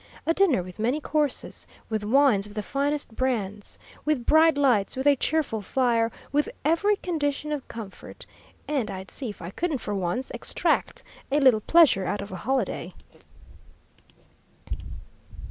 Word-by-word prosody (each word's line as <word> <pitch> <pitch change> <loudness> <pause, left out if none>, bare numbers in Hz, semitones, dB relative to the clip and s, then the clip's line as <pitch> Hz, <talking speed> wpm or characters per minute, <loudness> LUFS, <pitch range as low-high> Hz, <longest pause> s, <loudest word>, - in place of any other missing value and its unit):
A 330 - +3
dinner 335 - +3
with 180 +2 -11
many 245 +7 +1
courses, 300 -2 -1 0.2
with 215 -2 -2
wines 220 -3 +3
of 205 - -13
the 210 - -2
finest 280 -1 -2
brands, 210 -6 -2 0.3
with 300 -6 0
bright 315 -1 +5
lights, 250 -7 +2
with 265 - -2
a 285 -1 +6
cheerful 280 -6 0
fire, 235 +1 +1 0.2
with 295 +1 +1 0.2
every 370 +7 +3
condition 300 -5 -2
of 290 -3 -3
comfort 220 -4 -9 0.4
and 270 -8 -1
I'd 190 -1 -7
see 260 -5 -5
if 205 - -9
I 170 - -6
couldn't 320 - -1
for 210 -3 -5
once 190 +6 -2
extract - - -1 0.3
a 290 - +3
little 255 -6 +5
pleasure 300 - +5
out 205 - -2
of 200 - -10
a 185 - -5
holiday! 210 -5 -2
260 Hz, 150 wpm, -26 LUFS, 210-295 Hz, 0.4 s, a